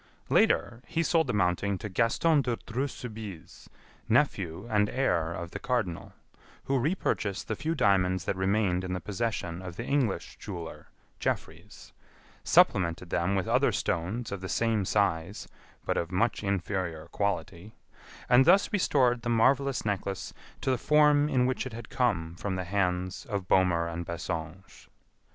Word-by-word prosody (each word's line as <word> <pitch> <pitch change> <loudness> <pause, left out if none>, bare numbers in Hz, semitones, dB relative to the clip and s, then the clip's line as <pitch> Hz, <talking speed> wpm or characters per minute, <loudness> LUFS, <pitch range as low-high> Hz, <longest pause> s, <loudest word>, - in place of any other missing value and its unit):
Later, 120 0 +2
he 165 - 0
sold 165 -1 +2
the - - 0
mounting 95 +1 +1
to 105 - -6
Gaston 120 - +2
de 120 -3 -1
Dreux 130 +5 -1
Soubise, 105 - -9 0.4
nephew 100 - +1
and 105 -2 +2
heir 85 -12 0
of 85 0 -6
the - - -6
Cardinal, 110 -10 -2 0.5
who 135 -1 +1
re 155 +9 +1
purchased 100 - -2
the - - -2
few 160 +4 -2
diamonds 95 - +2
that - - -1
remained 95 -1 +1
in 90 0 -3
the 90 - -2
possession 95 -3 -3
of 90 -2 -7
the 115 - -5
English 135 -8 -1
jeweler, 85 -5 -7 0.3
Jeffreys; - - -5 0.5
supplemented 85 0 +3
them 90 +4 +1
with 95 -2 -1
other - - +3
stones 100 +8 -2
of 100 -2 -5
the 95 - -5
same 115 -4 +1
size 95 -2 0 0.4
but - - 0
of 85 - -2
much 110 +5 0
inferior 95 -4 -2
quality, 100 0 -3 0.5
and 125 +2 +6
thus 200 +6 +4
restored 130 - +2
the 120 - -3
marvelous 135 +3 +2
necklace 100 -2 -3 0.3
to 130 - +1
the 130 - 0
form 150 0 +4
in 130 -4 +2
which 130 +1 -1
it 130 - -9
had 115 +1 -8
come 90 -10 0
from 100 0 -3
the 90 - -2
hands 90 -1 -1
of 100 -5 -3
Bohmer 90 -3 +3
and 85 +1 -4
Bassenge. 85 +1 -6
100 Hz, 160 wpm, -29 LUFS, 90-125 Hz, 0.5 s, and